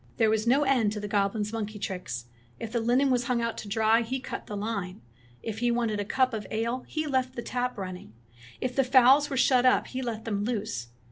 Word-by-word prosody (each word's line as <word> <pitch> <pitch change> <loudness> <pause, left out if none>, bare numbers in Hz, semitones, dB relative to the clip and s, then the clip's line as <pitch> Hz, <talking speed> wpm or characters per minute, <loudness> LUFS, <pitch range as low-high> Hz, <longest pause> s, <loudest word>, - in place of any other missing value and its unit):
"There 225 -2 +4
was 220 +1 0
no 270 +5 +4
end 255 -7 +2
to 210 - -4
the 205 - -4
goblin's 205 +1 0
monkey 215 -1 -4
tricks. 180 - -4 0.3
If 225 - -5
the 235 - 0
linen 250 +4 +2
was 250 -1 +1
hung 245 -1 +1
out 230 -1 -1
to 215 - -7
dry, 220 +2 +3
he 255 +3 -3
cut - - -7
the 205 - -5
line. 200 - -4 0.4
If 220 -1 -4
he 240 0 +2
wanted 235 -3 0
a 205 - -2
cup 255 +3 +1
of 215 -2 -4
ale 235 +3 -2
he 310 -1 -2
left 260 -3 0
the 235 - -4
tap 250 -1 -2
running. 185 - -7 0.5
If 255 -1 -3
the 270 - +4
fowls 260 +3 +6
were 270 - -2
shut 255 -1 +4
up 255 - +4
he 260 - -5
let 230 -3 -4
them 205 -3 -1
loose. 205 - -3
230 Hz, 230 wpm, -28 LUFS, 210-255 Hz, 0.5 s, fowls